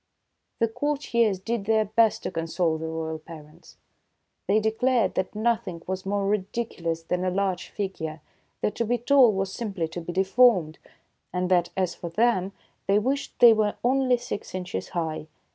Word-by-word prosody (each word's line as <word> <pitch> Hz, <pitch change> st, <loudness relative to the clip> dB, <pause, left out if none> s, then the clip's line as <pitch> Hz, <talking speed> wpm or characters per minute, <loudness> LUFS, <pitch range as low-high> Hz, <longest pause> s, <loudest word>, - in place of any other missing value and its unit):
The 230 Hz, -, +2 dB
courtiers 235 Hz, -5 st, 0 dB
did 215 Hz, +2 st, -3 dB
their 220 Hz, 0 st, +3 dB
best 220 Hz, +1 st, +2 dB
to -, -, -3 dB
console 165 Hz, -1 st, -1 dB
the 160 Hz, -, -4 dB
royal 160 Hz, 0 st, -4 dB
parents. 155 Hz, +1 st, -14 dB, 0.7 s
They 205 Hz, +3 st, +4 dB
declared 225 Hz, +3 st, +1 dB
that 185 Hz, +2 st, -2 dB
nothing 215 Hz, -6 st, -1 dB
was 190 Hz, +1 st, -4 dB
more 200 Hz, 0 st, 0 dB
ridiculous 190 Hz, -5 st, -2 dB
than 180 Hz, +2 st, -2 dB
a 185 Hz, -, +1 dB
large 190 Hz, -1 st, -1 dB
figure; 165 Hz, -6 st, -4 dB, 0.4 s
that 210 Hz, -, 0 dB
to 230 Hz, -, 0 dB
be 245 Hz, +2 st, +1 dB
tall 250 Hz, 0 st, +5 dB
was 195 Hz, -1 st, -2 dB
simply 200 Hz, -8 st, -3 dB
to 175 Hz, +2 st, -6 dB
be 170 Hz, -, -5 dB
deformed; 190 Hz, -3 st, +3 dB, 0.5 s
and 180 Hz, 0 st, -2 dB
that, 175 Hz, -1 st, +3 dB
as 185 Hz, -2 st, 0 dB
for 170 Hz, -, -7 dB
them, 195 Hz, 0 st, +1 dB, 0.4 s
they 200 Hz, +1 st, +4 dB
wished 270 Hz, +6 st, -1 dB
they 240 Hz, -2 st, +8 dB
were 215 Hz, -1 st, +1 dB
only 255 Hz, 0 st, +3 dB
six 240 Hz, -5 st, -6 dB
inches 180 Hz, -, -4 dB
high. 160 Hz, -2 st, -3 dB
195 Hz, 165 wpm, -26 LUFS, 175-230 Hz, 0.7 s, they